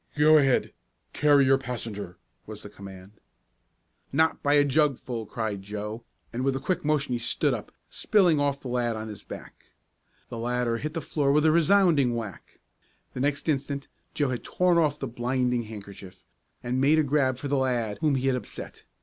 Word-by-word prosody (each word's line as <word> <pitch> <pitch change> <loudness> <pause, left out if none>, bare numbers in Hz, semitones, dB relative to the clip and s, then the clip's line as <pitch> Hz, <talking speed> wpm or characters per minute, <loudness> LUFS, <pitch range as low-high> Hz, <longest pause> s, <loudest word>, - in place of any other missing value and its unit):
"Go 155 +1 +6
ahead! 135 -3 +2 0.4
Carry 145 -2 +4
your 135 0 +4
passenger!" 115 -7 -5 0.3
was 105 -1 -9
the 105 - -10
command. 95 -1 -11 1.0
"Not 160 +3 +2
by 145 -1 +2
a 145 -1 +5
jugful!" 135 -6 0
cried 110 -3 -3
Joe, 105 +3 -6 0.3
and 125 +2 -2
with 135 0 +1
a - - -2
quick 180 +5 -2
motion 150 -3 0
he 120 - -1
stood 115 - +1
up, - - -6 0.2
spilling 180 -8 +2
off 140 -1 0
the - - -7
lad 120 -2 -1
on 110 0 -6
his 105 - -9
back. - - -11 0.6
The 115 - -6
latter 120 0 -1
hit 155 +4 -5
the 165 - -2
floor 145 -3 0
with 150 +2 +3
a 160 - +6
resounding 165 -7 +4
whack. 110 -5 -7 0.5
The - - -6
next 145 +3 -1
instant 140 -2 -2 0.3
Joe 145 -3 +1
had 125 -2 -3
torn 180 -1 +2
off 150 -3 +1
the 140 - -4
blinding 125 0 -1
handkerchief, 100 -3 -11 0.4
and 125 +2 -1
made 145 +3 +4
a 155 - +4
grab 135 -3 +1
for 140 - -5
the 140 0 +1
lad 120 -5 -1
whom 150 -3 +2
he 130 0 -1
had 135 -1 +2
upset. 125 - -8
130 Hz, 185 wpm, -26 LUFS, 115-145 Hz, 1.0 s, Go